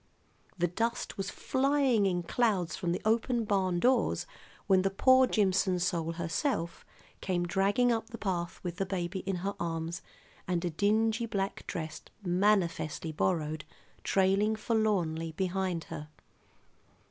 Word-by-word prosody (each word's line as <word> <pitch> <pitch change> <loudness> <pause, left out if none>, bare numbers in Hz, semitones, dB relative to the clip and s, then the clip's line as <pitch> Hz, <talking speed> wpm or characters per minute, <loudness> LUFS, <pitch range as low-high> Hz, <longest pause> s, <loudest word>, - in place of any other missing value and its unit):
The 175 - +2
dust 230 +7 -2
was 195 0 -3
flying 265 -6 +2
in 175 -2 0
clouds 195 -4 +1
from 175 -3 -2
the 175 - -2
open 230 +1 +1
barndoors 195 +5 +2 0.4
when 190 -2 +4
the 195 - +1
"poor 260 +6 +5
Jimson 190 -4 +2
soul" 170 -2 -1
herself 170 - -2 0.4
came 175 -2 0
dragging 200 +7 +2
up 225 -1 -1
the 235 - -7
path 175 -5 -3
with 175 -1 -4
the 195 - 0
baby 185 0 -2
in 195 - 0
her 200 - 0
arms 165 -1 -3 0.5
and 180 -1 0
a 175 - -1
dingy 220 +6 +1
black 195 -3 -3
dress, 160 -3 -5 0.2
manifestly 175 -4 +1
borrowed, 155 -2 -1 0.4
trailing 195 +3 +2
forlornly 190 -8 0
behind 185 -1 -1
her. 150 0 -8
190 Hz, 135 wpm, -30 LUFS, 170-215 Hz, 0.5 s, poor